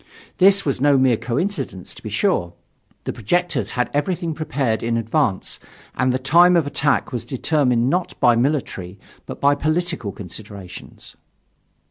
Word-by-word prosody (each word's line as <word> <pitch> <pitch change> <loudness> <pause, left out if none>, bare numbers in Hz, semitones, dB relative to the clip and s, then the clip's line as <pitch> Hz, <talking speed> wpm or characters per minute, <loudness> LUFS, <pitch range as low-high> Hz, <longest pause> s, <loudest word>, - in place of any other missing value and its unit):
This 195 +1 +5
was 135 -3 -1
no 145 -1 +5
mere 130 -2 +4
coincidence, 120 - -3
to - - -13
be - - -6
sure. 85 0 0 0.5
The - - -4
projectors 175 - -1
had 125 - 0
everything 170 +2 -1
prepared 135 -7 -1
in 115 0 0
advance, 115 -2 -1 0.3
and 130 0 +1
the 125 - +1
time 170 +7 +5
of 165 -4 +3
attack 145 0 0
was 120 -3 -3
determined 130 -3 +1
not 180 +5 -1
by 120 - +5
military 115 - -1 0.3
but - - -7
by 140 0 +4
political 155 - -1
considerations. 100 -1 -10
135 Hz, 145 wpm, -21 LUFS, 115-160 Hz, 0.5 s, This